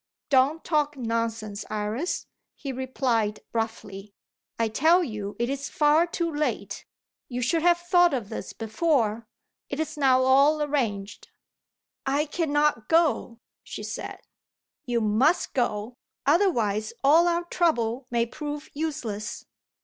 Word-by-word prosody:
"Don't 275 +4 +3
talk 295 -2 0
nonsense, 230 -3 -2
Iris," 215 +10 -2 0.3
he 275 - -5
replied 250 -4 -1
roughly. 210 -3 -4 0.4
"I 230 - +1
tell 320 +11 +4
you 210 -7 -5
it 235 - 0
is 275 +2 -3
far 305 +3 +3
too 335 -1 -2
late. 295 +1 -3 0.4
You 250 -1 -3
should 320 +7 +1
have 345 +1 +4
thought 350 0 +4
of 235 -7 -3
this - - -6
before. 225 -2 0 0.4
It 280 - -4
is 315 -1 -3
now 260 -2 +4
all 275 +4 +5
arranged." 230 -9 -2 0.8
"I 280 +3 +1
cannot 295 -6 0
go," 315 -8 +2 0.2
she - - -8
said. - - -5 0.7
"You 240 -2 0
must 250 +12 +2
go; 225 -2 -1 0.3
otherwise, 235 - +2
all 320 +5 +6
our 345 0 +1
trouble 260 -9 0
may 235 -1 +1
prove 295 +4 -6
useless." 280 -9 -4
265 Hz, 125 wpm, -26 LUFS, 225-310 Hz, 0.8 s, all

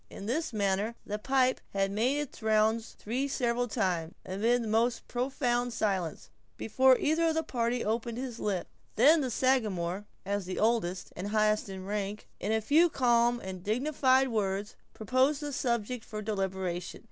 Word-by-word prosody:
In 195 - -9
this 275 +8 -1
manner 205 +1 0
the 210 +1 -4
pipe 260 +2 +2
had 195 0 +1
made 240 +7 +1
its 295 -4 -5
rounds 220 +1 +1
three 250 +6 -2
several 245 -2 0
times, 175 -6 -1
amid 230 +6 +1
the - - -4
most 230 +2 +1
profound 245 -1 -1
silence, 190 -8 -2 0.3
before 260 +3 +4
either 320 +2 +2
of 320 - +1
the 320 - +1
party 240 -4 -1
opened 230 +2 -2
his 250 -2 -5
lips. 195 -4 -2 0.3
Then 300 +8 +6
the 260 - -1
Sagamore, 205 -7 0 0.2
as 200 0 -2
the 185 - -4
oldest 210 -5 0
and 185 +3 -4
highest 215 0 +1
in 190 -1 -7
rank, 205 +1 -4
in 205 - -2
a 220 0 +2
few 310 +10 +4
calm 240 -3 +3
and 185 -2 -7
dignified 260 +3 +2
words, 205 -2 -2 0.2
proposed 260 +6 +2
the 290 -1 -5
subject 240 -2 -1
for 215 -1 -6
deliberation. 190 -4 -3
225 Hz, 165 wpm, -30 LUFS, 200-255 Hz, 0.3 s, Then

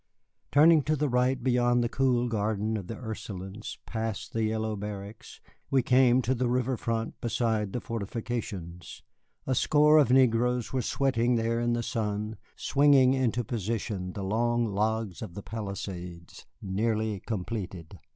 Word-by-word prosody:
Turning 155 +2 +6
to 155 +2 0
the 150 0 0
right 125 0 +1
beyond 120 -1 +3
the - - +1
cool 125 -1 +1
garden 110 -1 -1
of 100 -4 -5
the 115 - -5
Ursulines, 105 -3 -7
past 110 -2 -4
the 115 - 0
yellow 110 0 -1
barracks, 105 +1 -8 0.3
we 135 -2 +3
came 125 0 +4
to 130 - +1
the 125 -1 0
river 125 +1 +1
front 115 -1 -3
beside 110 -3 0
the 125 - -2
fortifications. 105 -6 -5 0.4
A 130 - 0
score 150 +4 +5
of 145 - +4
negroes 125 -1 +3
were 130 - +1
sweating 125 -1 +1
there 115 0 0
in 120 0 +1
the 120 0 -1
sun, 105 -2 -3 0.2
swinging 140 -2 +4
into 125 -2 0
position 105 -4 -3
the 100 - -5
long 120 +4 +1
logs 110 -2 -1
for - - -5
the 95 +3 -9
palisades, 95 -5 -7 0.2
nearly 110 +1 -1
completed. 95 -4 -5
115 Hz, 150 wpm, -28 LUFS, 105-125 Hz, 0.4 s, Turning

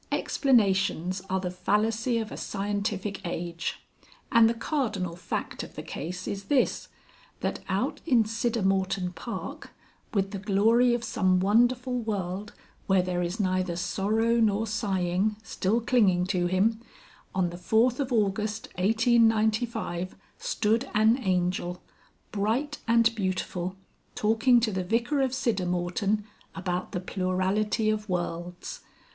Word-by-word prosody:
Explanations 195 - +2
are 190 0 +1
the 180 -1 -3
fallacy 220 +6 +1
of 220 -1 -3
a - - -5
scientific 200 0 -3
age. 170 -1 -4 0.5
And 230 -3 +6
the 235 - -1
cardinal 215 - -2
fact 170 -1 -4
of - - -9
the - - -6
case 180 +5 -6
is 200 0 -4
this, 270 +3 +1 0.5
that - - -2
out - - -1
in 245 -7 +5
Siddermorton 195 -5 0
Park, 205 +8 -6 0.4
with 195 -2 0
the 200 - -4
glory 225 +5 +3
of 235 - -4
some 185 -4 +2
wonderful 245 +5 +2
world 205 -2 -3 0.4
where 190 -2 +4
there 180 -1 -1
is 175 +5 -3
neither 185 -3 0
sorrow 215 +6 +1
nor 215 -1 +2
sighing, 200 -1 0
still 220 +1 0
clinging 210 -7 +3
to 180 -2 0
him, 210 +5 +1 0.5
on 180 -2 +1
the 175 - -7
4th 225 +7 +2
of 275 -2 -1
August 215 -1 0
1895, 220 -3 +2 0.2
stood 225 +5 0
an 220 +4 +4
Angel, 180 -3 0 0.5
bright 230 +9 -1
and 230 0 +4
beautiful, 185 -3 -2 0.4
talking 225 +3 +4
to 225 -1 +1
the 190 -1 -2
Vicar 235 +9 +1
of 265 - +2
Siddermorton 200 -4 0 0.3
about 180 -1 -3
the 180 - -3
plurality 190 +4 0
of 215 -1 -3
worlds. 175 0 -4
205 Hz, 130 wpm, -27 LUFS, 185-225 Hz, 0.5 s, And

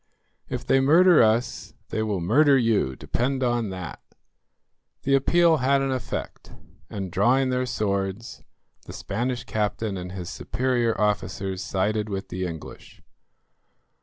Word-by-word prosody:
"If - - -4
they 135 - +3
murder 170 +6 +6
us 115 +2 0
they 110 - -2
will 105 -4 -1
murder 140 - +4
you, 110 - +1
depend 130 - -2
on 120 -3 0
that." 90 -2 -7 1.0
The 135 - +1
appeal 165 +4 +4
had 135 +1 +2
an 135 - -1
effect, 130 -2 -5 0.4
and, 95 -3 -5
drawing 130 +8 +2
their 125 0 0
swords, 100 -2 -3 0.5
the - - -8
Spanish 120 +4 -3
captain 105 -3 -2
and 90 0 -7
his 90 -2 -6
superior 120 -3 -1
officers 95 -2 -1
sided 105 +3 -1
with 95 0 -5
the 90 0 -3
English. 80 -2 -10
115 Hz, 135 wpm, -25 LUFS, 95-130 Hz, 1.0 s, murder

